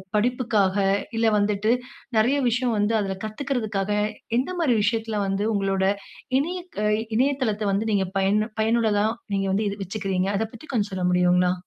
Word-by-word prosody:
படிப்புகாக, 215 -4 +1 0.4
இல்ல 225 - +3
வந்துட்டு 205 +2 +2 0.4
நெறைய 250 +6 +3
விஷயம் 245 0 0
வந்து 205 +2 +1
அதுல 190 -1 -3
கத்துக்குறதுக்காக 215 -4 -2 0.5
எந்த 265 - -2
மாதிரி 285 -8 +3
விஷயத்துல 225 -1 0
வந்து 195 +2 -1
உங்களோட 195 -1 0 0.6
இணைய 350 +6 -2 0.6
இணையதளத்தை 250 -6 +1
வந்து 215 +3 0
நீங்க 195 -2 +1
பயனு, 205 +3 +2
பயனுள்ளதா 220 -2 +2 0.3
நீங்க 195 0 0
வந்து 210 +1 +1 0.2
வச்சுக்கிறீங்க. 195 -1 -2
அத 220 - 0
பத்தி 270 +7 -12
கொஞ்சம் 210 -4 0
சொல்ல 185 -1 -1
முடியுங்களா? 180 0 +3
210 Hz, 140 wpm, -24 LUFS, 195-235 Hz, 0.6 s, இல்ல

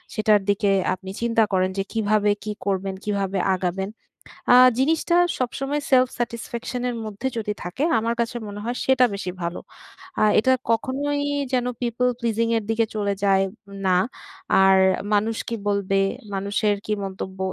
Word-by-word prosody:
সেটার 215 -1 +3
দিকে 200 0 +2 0.2
আপনি 190 +1 -7
চিন্তা 230 -1 +3
করেন 185 0 +2
যে, - - +1
কিভাবে 210 -1 +2
কি 215 - -2
করবেন? 195 -1 -1
কিভাবে 200 -2 -1 0.2
আগাবেন? 185 +1 -2 0.6
আ - - +9 0.2
জিনিসটা 320 +5 +2 0.2
সবসময় 275 +4 -2
সেলফ 255 -1 +5
স্যাটিসফ্যাকশন 235 +1 -4
এর 245 - -3
মধ্যে 215 +4 -4
যদি 210 -1 -2
থাকে, 180 +11 -3 0.2
আমার 230 +1 0
কাছে 235 +1 -3
মনে 205 0 -7
হয় 240 +1 -2
সেটা 260 -1 +5
বেশি 185 -2 -4
ভালো। 170 +1 -3 0.6
আ - - +5 0.2
এটা 260 +4 +3 0.2
কখনোই 285 +5 -1 0.3
যেন 250 -1 +2 0.2
people 245 +1 +1
pleasing 230 -1 0
এর 225 - -2
দিকে 225 0 +2
চলে 205 -1 0
যায় 195 -1 +4 0.4
না। 180 - +4 0.7
আর 190 0 +6 0.4
মানুষ 215 +2 +1
কি 230 - -2
বলবে? 195 -1 +1 0.3
মানুষের 205 +2 0
কি 215 - -1
মন্তব্য? 190 0 -6
215 Hz, 155 wpm, -23 LUFS, 195-240 Hz, 0.7 s, আ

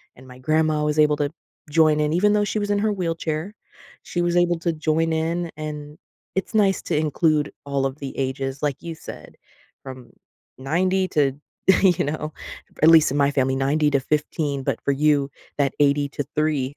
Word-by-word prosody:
and 130 +1 -16
my 125 0 -12
grandma 155 +2 +1
was 150 0 0
able 150 -1 +5
to 145 -1 -1 0.4
join 155 0 +4
in 150 0 +1
even 200 +5 +3
though 210 0 +2
she 210 +1 -2
was 205 - -3
in 205 - +2
her 215 0 +1
wheelchair. 165 0 -3 0.5
She 175 - -3
was 175 0 0
able 175 -1 +3
to 170 0 -1
join 160 +1 0
in, 165 +1 -1
and 150 -1 -7 0.4
it's 190 - -2
nice 195 -3 +3
to 160 - -1
include 155 0 +1
all 140 -1 -1
of 135 +1 -3
the 140 -2 -7
ages, 135 +1 -3
like 145 -3 0
you 165 -1 -6
said, - - -11 0.5
"from 130 -3 -10 0.5
90 185 +8 0
to" 140 -3 +2 0.5
you 180 -3 +4
know, 155 +1 -4 0.5
at 160 - +8
least 160 -4 +6
in 145 - -1
my 140 -1 +3
family, 135 -2 +1
90 145 +3 +1
to 140 - +3
15 150 0 -2
but - - -2
for - - 0
you 145 -1 +2 0.3
that 140 -1 +2
80 145 0 +2
to 145 0 -4
3. 150 -3 0
150 Hz, 190 wpm, -23 LUFS, 140-165 Hz, 0.5 s, at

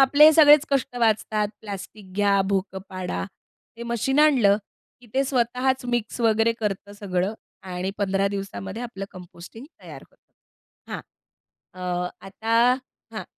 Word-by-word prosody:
आपले 285 +2 +7
हे 315 - +9
सगळेच 300 -1 +7
कष्ट 265 -3 0
वाचतात. 215 -2 +1
प्लास्टिक 200 -1 -9
घ्या, 200 0 +3
भोकं 195 -1 -1
पाडा. 185 -2 -4 0.5
ते 235 - -8
मशीन 235 +4 -1
आणलं, 255 -10 +5 0.4
की 245 - -17
ते 270 - +2
स्वतःच 255 0 0
मिक्स 240 -1 -2
वगैरे 225 0 +3
करतं 205 -1 -3
सगळं 200 -1 -2 0.3
आणि 185 0 -4
15 195 -1 +1
दिवसामध्ये 195 - -5
आपलं 230 -5 -6
कंपोस्टिंग 180 +5 -12 0.2
तयार - - -10
होतं. - - -35 0.6
हां. - - -4 0.7
अ, 185 - -11 0.5
आता 220 +4 -3 0.6
हां. - - -5
215 Hz, 135 wpm, -24 LUFS, 195-245 Hz, 0.7 s, हे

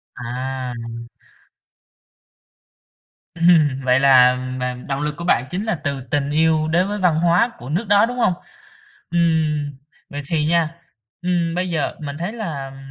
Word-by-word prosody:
À. 125 +1 -4 2.6
Ừm, 155 -6 +3
vậy 125 +1 +3
là 125 -2 +6
m 125 -1 -5
động 140 0 -2
lực 150 0 -2
của 170 - -6
bạn 125 -8 +2
chính 185 +4 -3
là 220 -4 0
từ 140 -1 -2
tình 145 -1 0
yêu 155 0 +2
đến 180 +4 +2
với 205 0 -3
văn 180 -4 +3
hóa 175 +7 +3
của 125 - -9
nước 185 +8 -2
đó, 205 +2 +5
đúng 245 +1 -5
hông? 185 - +3 0.8
Ừm, 160 -4 +1 0.4
vậy 145 0 -5
thì 155 -2 0
nha, 165 -1 +1 0.5
ừm, 175 -2 0
bây 180 0 -1
giờ, 160 -3 -1
mình 145 -1 -5
thấy 175 +6 -3
là, 165 -12 -5
ừm, 135 - -13
155 Hz, 160 wpm, -20 LUFS, 135-175 Hz, 2.6 s, là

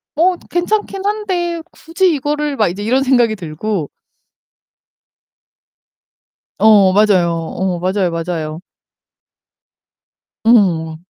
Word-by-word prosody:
'뭐 355 +4 +2
괜찮긴 390 +2 -2
한데 370 -5 -2
굳이 345 +2 0
이거를' 295 +1 -2
막 215 - +2
이제 185 +4 -5
이런 255 +5 +1
생각이 245 -4 +2
들고 170 -1 -4 2.7
어, 205 -2 +5
맞아요. 195 -4 +3
어 175 +2 -3
맞아요, 185 0 0
맞아요. 165 -2 -4 1.9
음. 175 -9 +3
215 Hz, 180 characters per minute, -16 LUFS, -, 2.7 s, 어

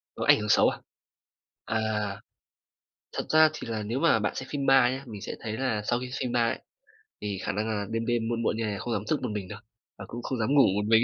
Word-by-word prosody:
Nó - - -3
ảnh - - +6
hưởng 105 0 -3
xấu - - +6
à? - - -6 0.9
À, 110 +1 0 1.3
thật - - -3
ra 155 0 +6
thì 125 - -7
là 110 -2 -3
nếu 115 +6 -2
mà 165 -9 +4
bạn 105 - -1
xem 130 0 -5
phim 140 -2 -2
ma 135 -2 +6
nhá, 135 +1 -5
mình 105 -4 -8
sẽ - - -5
thấy 110 -1 -4
là 125 -5 0
sau 120 0 +1
khi 125 0 -6
xem 125 -1 -2
ma 120 -1 +2
ấy, - - -3 0.6
thì 100 -2 -3
khả - - -1
năng 105 +3 -2
là 105 -2 -1
đêm 115 0 -2
đêm 120 -2 0
muộn 115 0 -1
muộn 110 - +1
như 115 - -1
này 105 -2 -3
không 120 - -3
dám 105 -2 -1
thức 155 - +1
một 125 - -1
mình 105 -3 -4
đâu, 105 +3 -8 0.4
và 100 - -8
cũng 120 +1 -7
không 130 - -3
dám 110 +3 0
ngủ 140 - +8
một 105 0 0
mình. 115 +1 +6
115 Hz, 265 wpm, -28 LUFS, 105-125 Hz, 1.3 s, ngủ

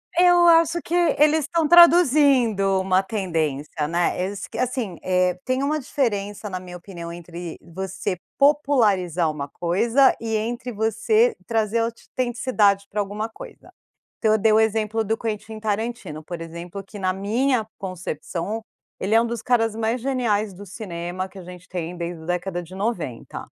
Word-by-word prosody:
Eu 350 0 +6
acho 335 0 +5
que 335 - -7 0.3
eles 305 +1 +5
estão 315 +1 0
traduzindo 275 - +5
uma 190 0 +2
tendência, 160 -7 -2
né. 170 +2 0
Eles 195 +1 -4
que, - - -9
assim, 245 -8 -2
eh, 180 -1 +1
tem 255 +1 0
uma 305 +2 0
diferença, 210 -7 -2
na 185 -1 -4
minha 180 -1 -9
opinião, 170 -2 -8
entre 170 0 -8
você 190 +1 -4 0.2
popularizar 215 - +3
uma 145 -2 -4
coisa 225 - +2
e 225 -1 -2
entre 235 +3 -3
você 225 - +2
trazer 225 -1 0
autenticidade 230 -3 0
para 210 - -3
alguma 210 +3 -4
coisa. - - -12 0.5
Então, 220 - +2
eu - - +4
dei 220 +1 +4
o 215 - +5
exemplo 220 0 +1
do 220 +1 -1
Quentin 220 0 -5
Tarantino, 210 -7 -3
por 170 +1 -7
exemplo, 170 +4 -7
que 205 - -11
na 185 -1 0
minha 220 +4 0
concepção, 185 +2 -5 0.4
ele 200 +3 -1
é 230 - +6
um 235 - -1
dos 235 -1 -4
caras 225 -3 +2
mais 225 +2 -1
geniais 225 -6 0
do 200 +3 -11
cinema, 185 -2 -5
que 195 - -15
a 185 - -8
gente 180 0 -12
tem, 175 -1 -4
desde 170 -1 -5
a - - -11
década 180 +1 -2
de 175 +2 -13
90. 190 - -4
210 Hz, 165 wpm, -23 LUFS, 180-240 Hz, 0.5 s, Eu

